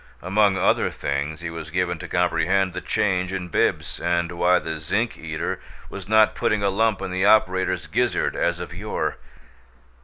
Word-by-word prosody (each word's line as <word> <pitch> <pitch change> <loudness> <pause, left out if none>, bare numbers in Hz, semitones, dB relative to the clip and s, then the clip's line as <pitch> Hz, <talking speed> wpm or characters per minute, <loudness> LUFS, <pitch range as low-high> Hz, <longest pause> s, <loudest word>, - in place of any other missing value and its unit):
Among 100 +1 +3
other - - +2
things 70 +3 -3
he 85 -1 -4
was 80 -1 -7
given 90 0 -1
to - - -7
comprehend 90 +2 +1
the 90 - -4
change 90 -3 0
in 90 -2 -4
Bibbs, - - 0
and 85 0 0
why 90 +1 +3
the 80 -2 -4
zinc 100 +10 -1
eater 80 -1 -4 0.3
was 100 0 -8
not 110 0 +5
putting 105 -1 0
a 100 - +3
lump 110 -1 +1
in 95 - -4
the 95 +1 0
operator's 95 -3 +3
gizzard - - 0
as 85 0 0
of 90 -1 -7
yore. 105 +4 -3
90 Hz, 175 wpm, -23 LUFS, 85-100 Hz, 0.3 s, not